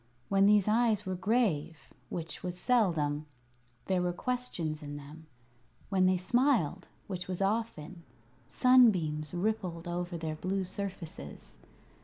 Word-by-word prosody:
When 195 0 +4
these 210 -1 +5
eyes 215 -1 +2
were 190 - -2
grave 180 - 0 0.2
which 165 -1 -5
was 180 -1 -4
seldom 165 - +1 0.6
there 185 -2 +1
were 180 0 0
questions 175 -9 -3
in 145 -1 -6
them; 150 +2 -12 0.6
when 185 -2 +3
they 185 0 +3
smiled 195 - +1 0.2
which 185 -3 -5
was 185 -1 -3
often 195 -5 -2 0.5
sunbeams 180 - +4
rippled 180 -3 -2
over 175 0 -3
their 160 -1 -3
blue 190 +3 -1
surfaces. 180 - -7
185 Hz, 125 wpm, -31 LUFS, 160-210 Hz, 0.6 s, these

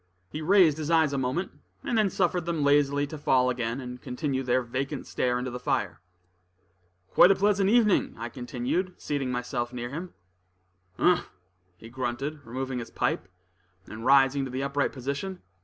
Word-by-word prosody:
He 155 - -5
raised 165 -3 +4
his 155 0 -3
eyes 160 -3 +3
a - - 0
moment, 130 +8 -2 0.3
and 240 - -1
then 215 -3 +3
suffered 175 -2 0
them 165 -4 0
lazily 145 0 +3
to 150 +1 -8
fall 125 -3 +3
again, 120 0 -2
and 125 -1 -7
continue 130 +1 -2
their 130 0 +1
vacant 135 +4 -4
stare 125 -1 0
into 125 0 -3
the 125 - -5
fire. 125 - -2 1.1
"Quite 180 - +7
a 195 - +5
pleasant 200 0 +2
evening," 220 -3 +3
I 120 +2 -5
continued, 130 +9 -3
seating 140 -3 -2
myself 125 -1 -2
near 120 -1 -5
him. 170 +5 -6 0.8
"Umph!" 180 -1 +2 0.5
he 110 - -12
grunted, 130 +4 -4
removing 130 +1 -3
his 120 - -7
pipe, - - -1 0.6
and 110 +1 -9
rising 135 +1 +4
to 135 - -4
the 130 +2 -3
upright 140 +1 0
position. 140 +8 -5
140 Hz, 170 wpm, -27 LUFS, 125-160 Hz, 1.1 s, Quite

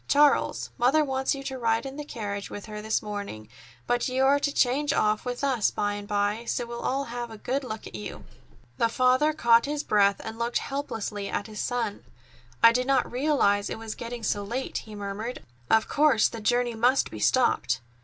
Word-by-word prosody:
Charles, 290 0 +3
Mother 270 +6 +4
wants 265 0 0
you 275 - -7
to 265 -1 -5
ride 230 +1 +1
in 270 0 -6
the 295 - -5
carriage 205 -7 -5
with 205 - -7
her 210 -1 -7
this 220 +1 -1
morning; 200 - -6 0.4
but 245 0 +1
you 260 +1 +1
are 280 +1 +4
to 285 - 0
change 280 +2 +2
off 215 +2 +1
with 245 +2 -4
us 260 -6 +2
by 205 0 -1
and 205 0 -6
by, 205 +2 0
so 240 - -1
we'll 235 0 -6
all 275 +2 0
have 240 -2 -5
a 220 - -9
good 265 +6 -2
look 220 -4 -6
at - - -10
you." 105 -1 -7 0.6
The 230 - +3
father 255 +5 +3
caught 235 -4 +4
his 295 0 -2
breath 200 -1 +3
and 225 +1 -7
looked 235 +1 0
helplessly 225 -7 -4
at - - -2
his 215 -1 -8
son. 235 -4 -2 0.6
"I 230 - +10
did 250 +2 0
not 270 -2 +2
realize 245 -7 +2
it - - -4
was 220 -1 -6
getting 235 0 -7
so 205 -1 0
late," 240 +6 -3
he 215 -1 -11
murmured. 205 +4 -5 0.3
"Of 220 0 +4
course 285 -7 +4
the 230 - -7
journey 240 +2 +1
must 245 +4 +2
be - - -7
stopped." 130 - +2
235 Hz, 205 wpm, -27 LUFS, 210-265 Hz, 0.6 s, I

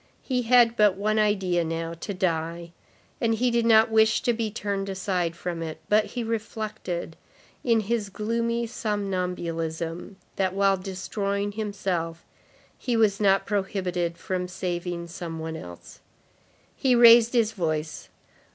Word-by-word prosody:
He 255 -2 0
had 240 -1 +5
but 210 -4 +4
one 215 +2 +1
idea 190 -5 +2
now, 165 0 -3
to 170 +5 -6
die; 170 -2 -2 0.5
and 225 -2 +2
he 245 +2 +1
did 235 -1 +2
not 225 0 +6
wish 220 0 +4
to 240 - +2
be 225 -1 -2
turned 200 -2 -3
aside 185 -3 -1
from 170 -1 -4
it, 160 -1 -5
but 210 +1 +4
he 245 - -4
reflected, 215 -6 -4 0.5
in 230 -3 +3
his 215 -1 -2
gloomy 230 +3 -1
somnambulism, 180 -6 -3 0.2
that 190 -1 0
while 195 0 +3
destroying 200 +2 -3
himself, 190 -6 -3 0.5
he 245 -3 -1
was 210 -3 +3
not 195 -2 +3
prohibited 185 -4 -2
from 180 -1 -3
saving 175 -1 -4
some 170 -1 -6
one 160 0 -5
else. 90 - -10 0.8
He 260 -2 +2
raised 235 0 +8
his 230 -3 +3
voice. 155 -6 -3
195 Hz, 140 wpm, -26 LUFS, 175-220 Hz, 0.8 s, raised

